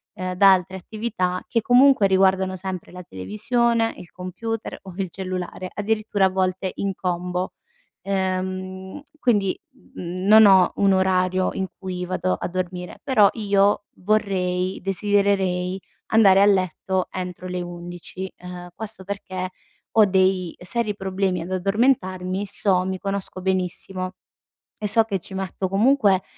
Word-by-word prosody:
ehm, 185 0 -4
da 195 +1 +7
altre 185 +1 -1
attività, 185 -3 -3
che 230 - +1
comunque 250 -1 +5
riguardano 190 0 +3
sempre 185 -1 -6
la 180 - -8
televisione, 225 - 0
il 175 - -12
computer 220 +5 -5
o 190 -2 -10
il 190 -3 -2
cellulare, 185 0 -5
addirittura 210 -1 0
a - - +4
volte 185 0 -1
in 195 -1 -2
combo. 180 0 -3 0.5
Ehm, 190 +2 -3 0.2
quindi, 205 -8 +1
mhmm, 185 -7 -7
non 220 0 +9
ho 190 -2 +6
un 200 -1 +3
orario 185 0 +2
in 190 - -2
cui 180 -1 -4
vado 185 0 -1
a - - -4
dormire, 180 0 -5
però 220 -7 +5
io 205 -2 +2
vorrei 185 -2 0
desidererei 195 -2 +1 0.3
andare 195 -3 +6
a - - +6
letto 190 -1 +1
entro 180 -1 -6
le 180 0 -3
11. 175 +2 -7
Ehm, 180 0 -9
questo 220 -3 -6
perché 185 -2 -5 0.5
ho 215 -2 +7
dei 185 -2 +1
seri 210 +2 0
problemi 190 -2 -1
ad 175 +3 -7
addormentarmi, 190 -1 0
so 190 -2 +1
mi 190 0 -3
conosco 195 -1 -4
benissimo 185 0 -2 0.7
e - - +1
so 225 +1 +6
che 200 -4 -2
ci 190 - -12
metto 190 0 -3
comunque, 205 -2 +3
190 Hz, 140 wpm, -23 LUFS, 185-200 Hz, 0.7 s, non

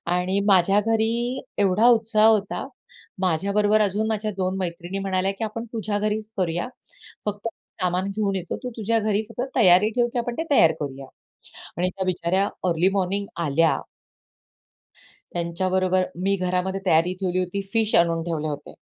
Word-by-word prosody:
आणि 185 +2 0
माझ्या 195 0 +5
घरी 230 +3 0 0.2
एवढा 205 +3 +3
उत्साह 220 -2 +4
होता. 210 -3 +1 0.5
माझ्याबरोबर 200 +5 +2
अजून 210 +2 0
माझ्या 215 -1 -1
2 185 0 -1
मैत्रिणी 180 +1 -4
म्हणाल्या 190 0 0
की - - -4
"आपण 225 +2 -4
तुझ्या 210 -2 -2
घरीच 215 +1 -2
करूया, 175 0 -1 0.6
फक्त 205 +1 -3 0.3
सामान 180 +2 0
घेऊन 200 -1 -1
येतो. 180 -2 -4
तू 250 - -3
तुझ्या 225 +1 +1
घरी 215 0 0
फक्त 230 - -5
तयारी 195 -3 +6
ठेव, 240 -1 +3
की 245 - 0
आपण 240 0 -3
ते 325 - -1
तयार 165 - +6
करूया." 135 -2 -5 0.7
आणि 180 +2 +1
त्या 190 +1 -4
बिचाऱ्या 185 +2 +1 0.2
अर्ली 170 +2 +3
मॉर्निंग 200 +1 -1 0.2
आल्या. 160 +3 +3 1.5
त्यांच्याबरोबर 185 +2 0 0.2
मी 195 +1 +2
घरामध्ये 185 +1 -1
तयारी 175 +1 +3
ठेवली 185 -1 0
होती. 185 +2 -2
फिश 225 -2 +1
आणून 170 -1 +3
ठेवले 155 -3 -2
होते. 145 -1 -6
195 Hz, 150 wpm, -24 LUFS, 180-215 Hz, 1.5 s, तयारी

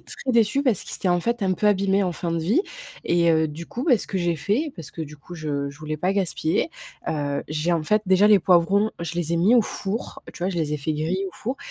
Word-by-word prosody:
très 265 - -5
déçue 235 +3 +3
parce 245 -9 +1
qu'ils - - -7
étaient, 190 - -1
en 175 0 +3
fait, 235 +5 -1
un 190 -1 +2
peu 200 +3 0
abîmés, 200 -1 +3
en 180 - -1
fin 170 +1 -4
de 165 - 0
vie. 195 - +2 0.4
Et, 170 -1 +3
heu, 160 -1 +3
du 160 +3 -8
coup, 245 - -5
bah, 255 -9 +4
ce - - -6
que 195 - -2
j'ai 175 -2 0
fait 235 - -1
parce 165 -5 -9
que 165 - -6
du 150 0 -9
coup 175 +5 -12
je 145 -3 -3
je 140 - -15
voulais 155 0 -4
pas 180 +5 0
gaspiller, 190 - 0 0.4
heu, 145 -2 -1
j'ai 155 +3 0
en 165 -2 +1
fait 210 +7 +2
déjà 190 +2 +5
les 210 - +7
poivrons, 190 +4 +3
je 170 -1 -4
les 170 -1 -2
ai - - +2
mis 190 +8 +4
au 230 - +5
four, 205 +2 -5
tu - - -9
vois? 185 - +1
Je 180 - -5
les 155 -2 -1
ai - - 0
fait 150 +2 -2
griller 165 +6 -1
au 185 - -8
four 255 +4 -4
175 Hz, 275 wpm, -24 LUFS, 160-205 Hz, 0.4 s, les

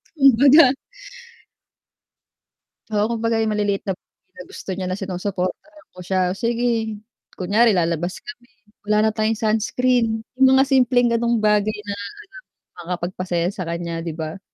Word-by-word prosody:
Kumbaga 275 +1 +6 2.2
oo, 210 0 +2
kumbaga 230 0 0
yung 220 -1 0
maliliit 205 -1 0
na 190 - -1
bagay - - -55
na 180 - -8
gusto - - -12
niya 190 - -4
na 185 - -2
sinusuportahan 195 - -5
ko - - -9
siya, 185 +1 0 0.2
sige. 230 -1 -1 0.3
Kunyari 215 +5 +2
lalabas 175 -1 -1
kami, 245 0 -12 0.4
"Wala 210 +1 +2
na - - +1
tayong 215 0 0
sunscreen." 225 +1 +1 0.2
Yung 265 0 +5
mga 270 - +5
simpleng 250 -2 +3
gano'ng 235 0 0
bagay 210 0 +2
na 205 -1 -6
alam 205 - -7 0.7
mong - - -64
makakapagpasaya 175 0 -2
sa 185 - -4
kanya 170 0 -4
'di 165 -2 -4
ba? 160 +3 -6
215 Hz, 145 wpm, -21 LUFS, 185-235 Hz, 2.2 s, Kumbaga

